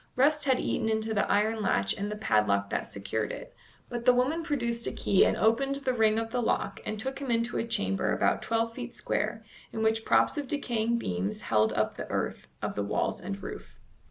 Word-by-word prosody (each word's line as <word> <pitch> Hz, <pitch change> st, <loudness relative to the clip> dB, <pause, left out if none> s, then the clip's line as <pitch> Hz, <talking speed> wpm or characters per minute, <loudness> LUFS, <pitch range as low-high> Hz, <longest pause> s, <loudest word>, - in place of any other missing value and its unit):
Rust 295 Hz, +3 st, +3 dB
had 260 Hz, -2 st, +3 dB
eaten 220 Hz, -, 0 dB
into 220 Hz, 0 st, 0 dB
the 205 Hz, -, +1 dB
iron 215 Hz, +2 st, +2 dB
latch 100 Hz, -, +2 dB
and 205 Hz, +1 st, -3 dB
the -, -, -3 dB
padlock 105 Hz, -, +1 dB
that -, -, -1 dB
secured 100 Hz, +2 st, -3 dB
it, -, -, -8 dB, 0.3 s
but 240 Hz, -1 st, -4 dB
the 250 Hz, 0 st, +6 dB
woman 270 Hz, +7 st, +1 dB
produced 235 Hz, -7 st, -1 dB
a -, -, -1 dB
key 195 Hz, -, +3 dB
and -, -, +2 dB
opened 250 Hz, +6 st, +2 dB
the 275 Hz, -2 st, -1 dB
ring 220 Hz, -2 st, +3 dB
of 225 Hz, 0 st, -2 dB
the 245 Hz, -, 0 dB
lock 225 Hz, -, -1 dB
and 215 Hz, -, -3 dB
took 265 Hz, +5 st, -3 dB
him 275 Hz, -2 st, -5 dB
into 230 Hz, 0 st, 0 dB
a 230 Hz, -, -2 dB
chamber 95 Hz, -, 0 dB
about -, -, +2 dB
twelve 230 Hz, 0 st, 0 dB
feet 245 Hz, 0 st, -7 dB
square, 215 Hz, +1 st, -2 dB, 0.3 s
in 220 Hz, -, -2 dB
which 220 Hz, 0 st, +2 dB
props 295 Hz, -, +3 dB
of 285 Hz, -, -4 dB
decaying 235 Hz, -5 st, 0 dB
beams 95 Hz, -, -2 dB
held 110 Hz, 0 st, +2 dB
up 110 Hz, 0 st, 0 dB
the -, -, -6 dB
earth -, -, -3 dB, 0.2 s
of -, -, -1 dB
the 105 Hz, -, -2 dB
walls 100 Hz, -, -1 dB
and 195 Hz, +1 st, -5 dB
roof. -, -, -8 dB
225 Hz, 215 wpm, -29 LUFS, 200-245 Hz, 0.3 s, the